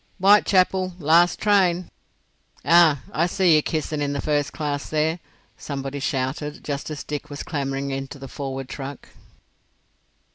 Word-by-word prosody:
"Whitechapel—last 185 -4 +3
train! 185 -4 +2 0.7
Ah, 165 -5 +5
I 165 +4 +1
see 180 -1 +3
yer 155 - +4
kissin' 155 -1 -3
in 145 0 -1
the 140 - -3
first 145 0 0
class 145 -2 -3
there!" 155 +2 0 0.4
somebody 140 -1 -5
shouted, 140 +2 -3
just 145 0 -4
as 150 -2 -6
Dick 150 -1 -6
was 145 -1 -6
clambering 140 -3 -3
into 135 +1 -5
the 135 0 -9
forward 135 0 -5
truck. 135 +1 -8
150 Hz, 135 wpm, -23 LUFS, 140-175 Hz, 0.7 s, Ah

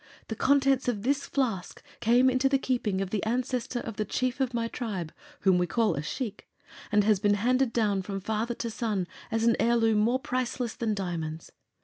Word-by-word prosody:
The 220 - -2
contents 275 +1 +3
of 215 -5 -1
this 280 +3 0
flask 230 -10 -2 0.2
came 245 +3 +4
into 260 +1 +3
the 275 - +3
keeping 235 -8 -1
of 195 -1 -3
the 210 - -1
Ancestor 245 +2 -1
of 225 - -7
the 215 - +1
Chief 255 +5 -2
of 260 -2 +1
my 230 -1 -1
Tribe 200 -10 -4 0.3
whom 185 -2 +4
we 180 - +1
call 230 +1 +2
a 140 - -2
Shiek 215 - -5 0.4
and 210 -1 +4
has 210 -2 +3
been 205 0 +3
handed 250 +4 +2
down 210 -4 +1
from 195 +1 -4
father 220 +4 -2
to 230 - -4
son 215 -5 -1 0.2
as 225 0 0
an 230 0 +4
heirloom 225 -2 +3
more 235 +4 +3
priceless 255 -3 -2
than 220 -3 -1
diamonds. 165 -4 -4
230 Hz, 200 wpm, -28 LUFS, 205-250 Hz, 0.4 s, came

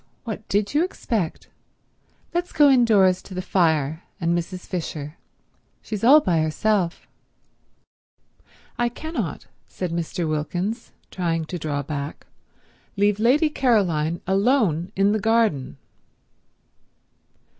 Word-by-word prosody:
What 220 -3 -7
did 205 +3 0
you 300 +3 +3
expect? 220 - -3 0.9
Let's 350 +1 -1
go 290 -2 +5
indoors 205 -8 +4
to 190 - -11
the - - -3
fire 160 -4 +1 0.2
and 170 -1 +1
Mrs. 180 +1 -4
Fisher. 155 -4 -5 0.7
She's 215 -2 -5
all 285 +6 +8
by 175 - +1
herself." 175 +3 0 1.7
"I 240 0 +2
cannot," 315 +7 -5 0.2
said 180 -2 -5
Mr. 170 0 -2
Wilkins, 175 +9 -3 0.2
trying 165 -3 -1
to 175 +2 -6
draw 145 -2 -2
back, 145 0 -5 0.7
"leave 205 0 +2
Lady 285 +7 +3
Caroline 175 - +1
alone 195 - +1
in 195 +1 +3
the 215 - +1
garden." 220 - +1
190 Hz, 115 wpm, -23 LUFS, 165-225 Hz, 1.7 s, all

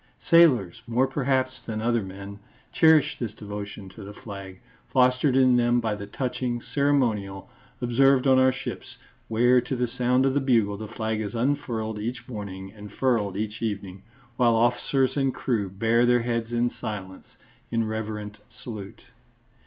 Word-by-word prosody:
Sailors, 125 - +5
more 120 +3 +2
perhaps 130 -1 -1
than 110 -2 -4
other 115 +1 +1
men, 100 +1 -9 0.3
cherish 155 -2 +4
this 110 -4 -4
devotion 105 -1 -7
to 105 +2 -12
the 100 +1 -10
flag, 100 -3 -9 0.3
fostered 125 +1 +3
in 130 -2 +5
them 120 0 +3
by 110 -2 -1
the 100 -1 -6
touching 125 +1 -3
ceremonial 120 -8 0 0.3
observed 135 +2 +3
on 130 -1 +5
our 130 0 +5
ships, 130 - -7 0.3
where 125 +3 +4
to 130 - -4
the 125 0 0
sound 125 +2 +1
of 135 - +2
the 145 - +2
bugle 115 -6 +2
the 110 +1 -7
flag 110 0 -3
is 105 +1 -5
unfurled 115 -4 -1
each 120 +4 -5
morning 100 -4 -7
and 105 -2 -11
furled 105 -6 0
each 105 0 -4
evening, 100 -4 -4 0.4
while 120 -2 +4
officers 125 +3 +1
and 135 -2 0
crew 110 -6 -1
bare 115 +5 +2
their 120 -1 +3
heads 115 -1 -2
in 120 0 +1
silence, 95 -3 -7 0.4
in 115 -1 0
reverent 105 -1 -5
salute. 105 -5 -9
115 Hz, 160 wpm, -25 LUFS, 105-130 Hz, 0.4 s, Sailors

